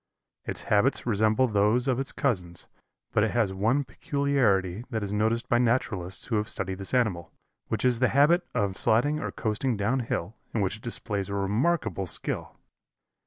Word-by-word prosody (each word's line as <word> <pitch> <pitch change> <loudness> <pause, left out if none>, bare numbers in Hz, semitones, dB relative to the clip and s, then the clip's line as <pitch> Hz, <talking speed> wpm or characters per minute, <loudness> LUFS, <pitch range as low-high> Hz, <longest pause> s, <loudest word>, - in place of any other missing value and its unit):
Its - - -3
habits 105 +7 +2
resemble 110 +3 +3
those 110 +4 +2
of 130 -1 +1
its 135 - -1
cousins, 90 -10 -1 0.5
but 105 - +2
it 110 - +2
has 110 -5 +1
one 115 +9 +1
peculiarity 120 -10 0
that 110 -4 -2
is 100 0 -3
noticed 110 +3 0
by 120 - +3
naturalists 110 -7 0
who 115 - 0
have 105 +2 -1
studied 95 0 -3
this 95 +6 -1
animal, 95 -10 0 0.4
which - - -1
is 125 -2 +3
the 130 - +4
habit 150 +7 +4
of 100 -2 0
sliding 145 +7 +2
or - - -3
coasting 110 +2 -1
down 115 +6 +1
hill, 110 -5 -3 0.2
in 110 - +1
which 95 +1 -1
it - - -19
displays 105 -4 -3
a 100 - -3
remarkable 100 - 0
skill. - - -2
110 Hz, 175 wpm, -27 LUFS, 100-125 Hz, 0.5 s, the